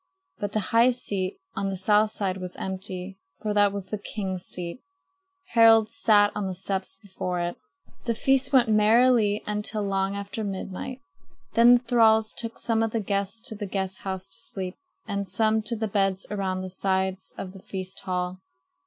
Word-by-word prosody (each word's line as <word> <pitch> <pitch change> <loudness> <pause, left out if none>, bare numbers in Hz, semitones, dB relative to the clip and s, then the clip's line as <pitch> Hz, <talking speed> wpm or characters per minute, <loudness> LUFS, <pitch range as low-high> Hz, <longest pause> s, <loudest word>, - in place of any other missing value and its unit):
But 205 -2 -3
the 215 - +2
high 230 +2 +6
seat 200 -6 -2 0.2
on 195 - -1
the 190 - -3
south 210 +3 +3
side 195 -3 -2
was 180 -1 -7
empty; 190 0 -5 0.2
for 210 -1 -2
that 205 -1 +4
was 195 -2 -6
the 215 - -2
king's 190 -3 -4
seat. 175 +6 -6 0.7
Harald 225 -2 +6
sat 210 -5 +4
on 205 -2 -2
the 185 - -4
steps 190 +1 -3
before 185 -3 -4
it. 175 0 -2 0.5
The 230 -1 0
feast 270 +2 +2
went 255 -4 +5
merrily 215 0 +4
until 210 0 -1
long 195 0 0
after 200 +2 -4
midnight. 195 +5 -5 0.5
Then 235 +2 +7
the 240 - -9
thralls 220 -2 +4
took 230 -1 -3
some 225 -2 0
of 225 - +1
the 225 - -1
guests 200 +1 -1
to 235 - -5
the 205 -1 -5
guest 190 0 -2
house 190 -1 -4
to - - -9
sleep, 185 -1 -5 0.3
and 200 -1 -2
some 220 +3 +2
to 225 +2 -3
the 220 0 -2
beds 195 -2 +1
around 190 -2 -1
the 185 - -6
sides 190 0 -1
of 185 - -5
the 195 - -12
feast 190 -1 -4
hall. 180 0 -3
200 Hz, 180 wpm, -26 LUFS, 190-220 Hz, 0.7 s, Then